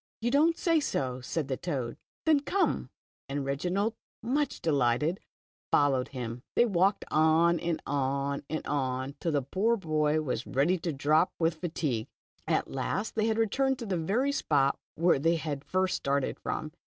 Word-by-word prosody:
"You 240 Hz, +1 st, 0 dB
don't 315 Hz, +4 st, +4 dB
say 330 Hz, -2 st, +3 dB
so," 130 Hz, -, -2 dB
said 150 Hz, +3 st, -2 dB
the 130 Hz, -2 st, -2 dB
toad; 135 Hz, -9 st, -3 dB, 0.3 s
"then 315 Hz, -3 st, +5 dB
cojue," 375 Hz, +7 st, 0 dB, 0.4 s
and 140 Hz, 0 st, -2 dB
Reginald, 180 Hz, +10 st, 0 dB, 0.3 s
much 285 Hz, +5 st, 0 dB
delighted, 150 Hz, +3 st, +1 dB, 0.5 s
followed 135 Hz, -3 st, +3 dB
him. 120 Hz, -2 st, -5 dB
They 240 Hz, -, +5 dB
walked 195 Hz, -2 st, +2 dB
on 160 Hz, +2 st, +4 dB
and 170 Hz, -1 st, -1 dB
on 140 Hz, 0 st, -1 dB
and 155 Hz, -, -3 dB
on, 130 Hz, -1 st, -1 dB
till 165 Hz, -, -1 dB
the 140 Hz, -2 st, +1 dB
poor 210 Hz, -, +1 dB
boy 155 Hz, -4 st, +1 dB
was 125 Hz, -5 st, -3 dB
ready 155 Hz, +8 st, +2 dB
to 165 Hz, 0 st, -2 dB
drop 155 Hz, +4 st, +2 dB
with 165 Hz, -1 st, 0 dB
fatigue. 150 Hz, -10 st, -2 dB, 0.4 s
At -, -, 0 dB
last 135 Hz, -, -2 dB
they 220 Hz, 0 st, +1 dB
returned 255 Hz, +5 st, +1 dB
to 240 Hz, -, -6 dB
the 195 Hz, -3 st, -1 dB
very 210 Hz, -, +1 dB
spot 140 Hz, -, +1 dB, 0.2 s
where 170 Hz, -2 st, +3 dB
they 165 Hz, +4 st, +3 dB
had 150 Hz, -4 st, -3 dB
first 185 Hz, +1 st, 0 dB
started 140 Hz, -1 st, -1 dB
from. 155 Hz, -, -3 dB
160 Hz, 165 wpm, -29 LUFS, 140-195 Hz, 0.5 s, then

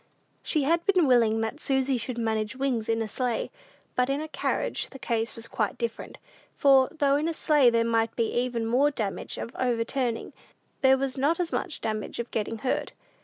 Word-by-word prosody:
She 305 Hz, -3 st, 0 dB
had 335 Hz, +4 st, +2 dB
been 370 Hz, -4 st, +4 dB
willing 230 Hz, -4 st, +4 dB
that 225 Hz, +7 st, -3 dB
Susy 265 Hz, -2 st, +1 dB
should 240 Hz, +1 st, -4 dB
manage 220 Hz, -1 st, -1 dB
Wings 255 Hz, -5 st, -1 dB
in 225 Hz, 0 st, +1 dB
a -, -, -4 dB
sleigh, 245 Hz, 0 st, -2 dB, 0.4 s
but 250 Hz, +1 st, +2 dB
in 275 Hz, +1 st, 0 dB
a 310 Hz, -, -4 dB
carriage 310 Hz, -, -2 dB
the 270 Hz, -, -10 dB
case 230 Hz, -3 st, -2 dB
was 230 Hz, 0 st, -7 dB
quite 215 Hz, -3 st, -2 dB
different; 235 Hz, -1 st, -4 dB, 0.4 s
for, 270 Hz, -2 st, +5 dB
though 285 Hz, -4 st, +2 dB
in 305 Hz, +2 st, 0 dB
a 330 Hz, -, -2 dB
sleigh 295 Hz, -6 st, +4 dB
there 230 Hz, -1 st, +2 dB
might 230 Hz, -1 st, +1 dB
be 230 Hz, -2 st, 0 dB
even 240 Hz, -2 st, -1 dB
more 255 Hz, +6 st, +3 dB
danger 215 Hz, -9 st, -4 dB
of 230 Hz, -, -8 dB
overturning, 240 Hz, 0 st, -1 dB, 0.5 s
there 265 Hz, 0 st, +6 dB
was 265 Hz, 0 st, -2 dB
not 305 Hz, +6 st, +2 dB
as 355 Hz, -1 st, -1 dB
much -, -, -3 dB
danger 215 Hz, 0 st, -3 dB
of 235 Hz, -, -23 dB
getting 220 Hz, +1 st, -2 dB
hurt. 255 Hz, +4 st, -2 dB
250 Hz, 195 wpm, -27 LUFS, 230-275 Hz, 0.5 s, there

